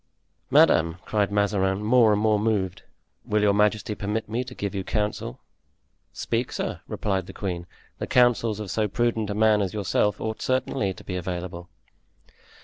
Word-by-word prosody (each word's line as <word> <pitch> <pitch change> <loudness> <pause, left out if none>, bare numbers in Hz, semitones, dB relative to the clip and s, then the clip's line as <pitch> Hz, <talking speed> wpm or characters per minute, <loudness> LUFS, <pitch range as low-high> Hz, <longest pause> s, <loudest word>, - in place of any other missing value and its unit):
"Madame," 80 +1 +4
cried 105 -2 0
Mazarin, 100 -1 +1
more 115 0 +5
and 105 - +2
more 105 -1 +3
moved, 105 -4 -1 0.4
"will 105 0 0
your 100 -1 +4
majesty 105 +2 +1
permit 105 +2 -3
me 115 +3 -2
to 125 0 -10
give 100 -1 -3
you 95 -1 -3
counsel?" 105 - -2 0.7
"Speak, - - -2
sir," - - -3
replied 95 -3 -2
the - - -9
queen; 90 -3 -4 0.3
"the - - -3
counsels 120 -3 +3
of 105 -3 -5
so 110 -1 +1
prudent 115 0 0
a 100 - -2
man 110 -1 +4
as 95 0 -2
yourself 105 +1 +1
ought 110 0 -4
certainly 130 -5 0
to - - -11
be 90 - -5
available." 90 -1 -5
105 Hz, 165 wpm, -25 LUFS, 95-110 Hz, 0.7 s, more